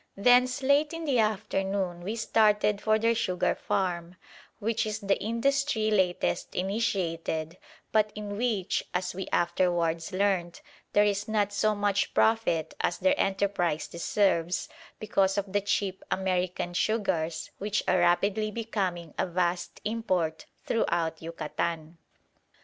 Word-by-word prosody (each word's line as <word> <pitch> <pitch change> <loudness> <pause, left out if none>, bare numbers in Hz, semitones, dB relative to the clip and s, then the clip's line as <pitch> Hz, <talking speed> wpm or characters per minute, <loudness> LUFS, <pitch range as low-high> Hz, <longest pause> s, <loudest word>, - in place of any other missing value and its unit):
Thence 250 +4 +4
late 285 +3 +3
in 330 0 -5
the 270 -5 +2
afternoon 195 -4 0
we 205 +6 -3
started 210 -2 +2
for 215 0 +3
their 230 +1 +2
sugar 185 -6 0
farm, 175 -2 -2 0.4
which 220 +1 0
is 215 0 -2
the 200 -2 0
industry 230 0 +1
latest 185 -3 0
initiated, 180 -5 -2 0.3
but 215 -1 +3
in 205 -1 -5
which, 215 -4 0
as 180 0 -1
we 190 +1 -5
afterwards 170 -2 +1
learnt, 185 -3 0 0.3
there 205 - +5
is 205 0 0
not 205 -2 0
so 215 +1 +2
much 205 -1 0
profit 220 -8 +2
as - - 0
their 280 - +3
enterprise 195 - 0
deserves, 170 -1 0 0.3
because 195 -2 +1
of 200 -1 -2
the 205 - +2
cheap 195 -1 -1
American 180 -2 -1
sugars 175 -6 -1
which 210 +1 -1
are 185 - +3
rapidly 200 +5 +2
becoming 195 -7 -3
a - - +1
vast 175 0 -1
import 185 -8 -1 0.2
throughout 165 -7 0
Yucatan. 165 0 -4
195 Hz, 130 wpm, -28 LUFS, 175-215 Hz, 0.4 s, there